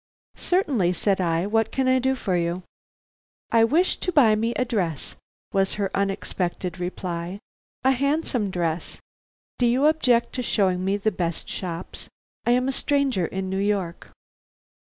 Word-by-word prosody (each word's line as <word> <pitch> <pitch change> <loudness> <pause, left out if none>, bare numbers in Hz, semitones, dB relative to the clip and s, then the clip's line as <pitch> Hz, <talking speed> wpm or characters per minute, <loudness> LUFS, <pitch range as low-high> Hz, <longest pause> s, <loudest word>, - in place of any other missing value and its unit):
"Certainly," 270 - +1
said 195 +1 +1
I. 170 0 +1
"What 225 +1 +1
can 265 -1 0
I 260 0 +4
do 265 +1 +1
for 195 -7 -1
you?" 175 +1 -1 0.9
"I 230 -1 +5
wish 320 +11 +3
to 365 - -2
buy 260 -10 +5
me 225 +2 +1
a 255 - +1
dress," 180 - -2 0.4
was 195 0 +1
her 200 -2 -1
unexpected 185 -2 -2
reply. 175 0 -4 0.5
"A 265 - +5
handsome 270 -5 0
dress. 170 -2 -2 0.6
Do 245 - +4
you 255 +4 +3
object 260 -7 +3
to 255 - -2
showing 190 -6 +1
me 195 +2 +1
the 215 +2 0
best 170 -3 -3
shops? 175 -1 -6 0.4
I - - +4
am 250 +1 +2
a - - +1
stranger 270 - +1
in 190 0 -4
New 190 - -1
York." 195 -4 -1
200 Hz, 155 wpm, -24 LUFS, 180-255 Hz, 0.9 s, I